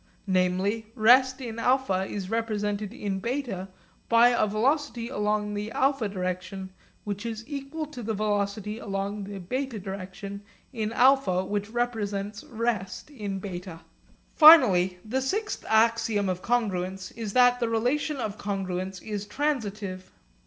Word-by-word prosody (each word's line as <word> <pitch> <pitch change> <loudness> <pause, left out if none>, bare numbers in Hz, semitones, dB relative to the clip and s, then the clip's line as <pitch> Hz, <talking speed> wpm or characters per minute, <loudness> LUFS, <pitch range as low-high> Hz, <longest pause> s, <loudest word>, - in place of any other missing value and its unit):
Namely 190 +3 +1
rest 255 +4 +5
in 230 -3 -6
α 230 -6 +1
is 195 -2 -4
represented 210 -2 -2
in 200 -5 -4
β 235 -6 -3 0.4
by 235 +1 +7
a 240 -3 +2
velocity 240 +2 0
along 210 -3 -1
the 210 +2 -4
α 265 -6 +1
direction 185 0 -4 0.3
which 205 0 -4
is 225 -1 -4
equal 285 +2 -5
to 290 -5 -9
the 220 -1 -2
velocity 210 +1 -1
along 200 -1 -3
the 200 0 -7
β 240 +3 -4
direction 195 +1 -6 0.3
in 220 -3 -2
α 245 -7 +3
which 205 0 -2
represents 215 -3 -2
rest 230 -3 -3
in 205 -7 -4
β. 180 -3 -7 0.5
Finally 205 - +8
the 255 +5 -1
sixth 420 +10 -2
axiom 225 -2 +3
of 185 0 -2
congruence 190 -5 -1
is 220 -3 -5
that 245 0 +5
the 235 -2 0
relation 255 +7 0
of 215 -4 -4
congruence 190 -2 -3
is 210 -1 -4
transitive. 210 -9 -3
210 Hz, 135 wpm, -27 LUFS, 195-245 Hz, 0.5 s, Finally